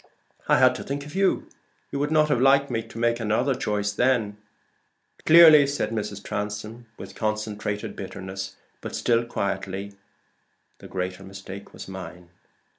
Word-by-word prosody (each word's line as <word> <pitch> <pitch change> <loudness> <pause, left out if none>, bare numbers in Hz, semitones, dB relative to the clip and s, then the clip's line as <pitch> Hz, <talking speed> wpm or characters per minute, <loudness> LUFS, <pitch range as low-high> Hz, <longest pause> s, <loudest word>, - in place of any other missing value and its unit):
"I - - +5
had - - +5
to - - -7
think 140 +1 -4
of 150 - -11
you. 195 0 +1 0.4
You 140 - -3
would 145 +1 0
not 155 -1 +3
have 125 -4 +2
liked 135 +1 +4
me 115 -1 0
to 115 - -13
make 120 0 +1
another 115 +5 +1
choice 105 -5 -1
then." 110 -2 +1 0.9
"Clearly," 155 -3 +9
said 140 -4 -2
Mrs. 105 -2 -4
Transome, 105 +3 -5
with - - -9
concentrated 105 -1 -3
bitterness, 95 0 -7 0.3
but - - -6
still 115 0 +2
quietly; 100 -2 -3 0.9
"the - - -11
greater 90 0 -4
mistake 95 +1 -10
was - - -10
mine." 90 -2 -9
110 Hz, 150 wpm, -25 LUFS, 100-135 Hz, 0.9 s, Clearly